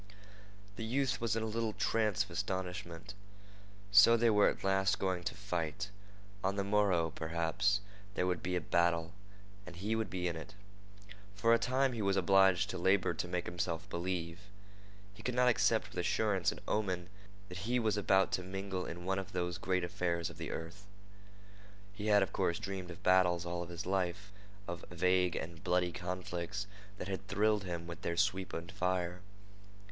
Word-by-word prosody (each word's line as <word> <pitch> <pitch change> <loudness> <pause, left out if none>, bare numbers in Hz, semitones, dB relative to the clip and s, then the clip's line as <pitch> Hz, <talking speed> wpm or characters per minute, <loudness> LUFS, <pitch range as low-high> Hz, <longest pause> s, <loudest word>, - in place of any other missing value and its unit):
The 115 - -4
youth 130 +3 0
was 115 -1 +1
in 115 - -1
a - - -1
little 110 0 -1
trance 105 -2 +1
of 100 - -14
astonishment. 90 -2 -4 0.8
So 105 +3 +8
they 115 0 +4
were 105 -1 +5
at - - -5
last 95 0 +2
going 95 -2 -1
to - - -2
fight. 95 -1 -3 0.5
On 95 +1 +1
the 100 - 0
morrow, 100 -5 +2
perhaps, 85 +6 0 0.3
there 90 - +1
would 90 -2 0
be 90 0 -2
a 90 - 0
battle, 85 +1 +1 0.5
and 90 -3 -10
he 105 +5 -1
would 110 -3 -1
be 90 -1 -2
in 85 - -2
it. 85 +5 -9 0.8
For 115 +3 +4
a 115 - +5
time 130 +3 +2
he 115 - -3
was 100 -1 +2
obliged 95 -1 +5
to - - -4
labor 95 +1 +3
to - - -3
make 90 0 -2
himself 85 0 -3
believe. 85 -1 -3 0.7
He 105 - -13
could 125 +2 -2
not 125 0 +4
accept 115 -2 +3
with - - -5
assurance 95 0 +1
an - - -9
omen 90 -5 -1 0.4
that 90 -2 -7
he 125 - +3
was 110 -3 +2
about 95 -1 +3
to - - 0
mingle 95 0 -4
in 85 +1 -7
one 95 +1 +1
of 95 - -8
those 90 -1 -2
great 90 -1 0
affairs 85 -2 -1
of - - -14
the - - -4
earth. 85 +5 -7 1.1
He 105 +1 -5
had, 105 -2 +6
of - - -4
course, 90 -3 +1
dreamed 95 -3 -5
of 85 - -10
battles 90 -2 +4
all 85 0 -3
his 85 +2 -6
life—of 100 0 -4
vague 90 0 +2
and 85 +1 -6
bloody 90 -1 +2
conflicts 90 +2 -4 0.3
that 95 - -5
had 100 0 -4
thrilled 105 0 +2
him 85 -2 -4
with 85 0 -8
their 85 -1 -2
sweep 95 +1 +1
and 85 +1 -5
fire. 90 -2 -1
95 Hz, 180 wpm, -34 LUFS, 85-100 Hz, 1.1 s, So